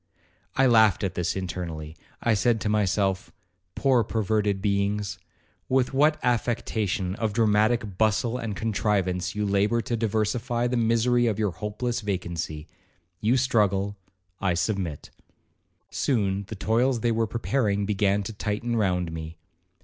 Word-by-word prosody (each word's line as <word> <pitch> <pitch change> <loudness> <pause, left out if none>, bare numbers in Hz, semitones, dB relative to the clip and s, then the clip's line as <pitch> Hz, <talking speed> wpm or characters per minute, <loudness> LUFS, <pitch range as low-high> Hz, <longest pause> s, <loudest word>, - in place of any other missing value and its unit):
I 135 - +4
laughed 110 -5 +5
at 95 - -1
this 90 -1 -1
internally. 85 -4 -5 0.3
I 120 - +3
said 110 +2 +2
to 105 - -1
myself, 100 -2 0 0.4
'Poor 130 -4 +3
perverted 105 -2 0
beings, 100 +1 -1 0.5
with 130 -1 +2
what 150 +3 +4
affectation 110 -5 0
of 110 -3 -1
dramatic 110 -2 +2
bustle 110 +2 +2
and 115 -4 -4
contrivance 95 -4 -1
you 105 0 -1
labour 100 +3 +2
to 115 +2 -2
diversify 115 +2 0
the 125 +1 0
misery 120 +1 +2
of 110 -3 0
your 105 -3 0
hopeless 105 +7 -3
vacancy;—you 90 +2 -4
struggle,—I 95 -6 -1
submit.' 90 -5 -2 0.8
Soon 100 -6 0
the 110 - -6
toils 115 +4 +1
they 120 - +2
were 115 0 +1
preparing 110 -3 0
began 100 0 +1
to 110 - -6
tighten 105 +3 -2
round 90 -6 0
me. 80 0 -7
105 Hz, 130 wpm, -26 LUFS, 95-115 Hz, 0.8 s, laughed